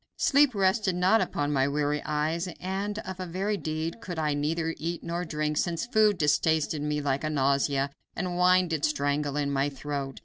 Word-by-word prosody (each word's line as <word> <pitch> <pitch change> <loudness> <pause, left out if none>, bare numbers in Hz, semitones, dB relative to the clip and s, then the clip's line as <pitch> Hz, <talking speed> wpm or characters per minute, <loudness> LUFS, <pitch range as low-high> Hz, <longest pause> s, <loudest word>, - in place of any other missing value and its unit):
Sleep 285 -4 +4
rested 190 0 +2
not 185 +5 +4
upon 145 0 -1
my 135 -1 +2
weary 145 +1 0
eyes, 155 +4 -1
and 195 +3 -3
of 190 0 -6
a 185 - -3
very 195 +5 -1
deed 160 +3 -4
could 175 -6 -6
I 155 -2 0
neither 160 +3 -1
eat 170 +2 -3
nor 170 +1 -3
drink, 150 -1 -2
since 170 +3 0
food 215 -4 +3
distasted 155 0 +1
me 150 0 -1
like 140 0 0
a 155 - 0
nausea, 140 -1 +1 0.2
and 180 -1 -3
wine 180 0 +4
did 160 -3 -2
strangle 145 -1 0
in 140 -1 0
my 140 +1 +1
throat. 140 -1 -5
155 Hz, 190 wpm, -27 LUFS, 145-185 Hz, 0.2 s, Sleep